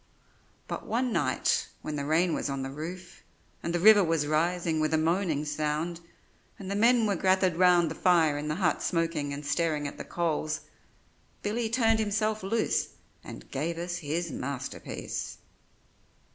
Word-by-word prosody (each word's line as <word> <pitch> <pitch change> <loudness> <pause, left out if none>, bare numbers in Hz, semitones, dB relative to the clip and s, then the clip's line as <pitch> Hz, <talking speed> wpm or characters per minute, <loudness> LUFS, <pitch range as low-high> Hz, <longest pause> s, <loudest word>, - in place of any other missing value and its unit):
But - - -5
one 245 +1 0
night - - +1 0.2
when 155 - -4
the 140 -1 -3
rain 165 +2 +2
was - - -2
on 135 -1 -3
the 135 - -5
roof, 175 +5 -8 0.4
and 170 - -3
the 175 - 0
river 210 +2 +8
was 165 -3 +1
rising 165 +2 +1
with 155 +1 +1
a - - +3
moaning 160 -2 +1
sound, 150 +3 -2 0.6
and 195 -1 -7
the - - -1
men 230 +2 +4
were 205 -2 +1
gathered 185 0 +2
round 175 -2 +4
the - - -2
fire 165 -5 +3
in 145 +1 -4
the 150 - -1
hut 175 -4 +1
smoking 165 -4 -1
and 140 +1 -6
staring 150 -1 0
at - - -9
the - - -4
coals, 155 -2 -2 0.8
Billy 220 +2 -1
turned 225 -1 +3
himself 215 0 0
loose 220 +4 0 0.3
and - - -10
gave 160 +5 -2
us 175 +1 -3
his 165 +1 -3
masterpiece. 140 +1 -5
170 Hz, 165 wpm, -28 LUFS, 155-190 Hz, 0.8 s, river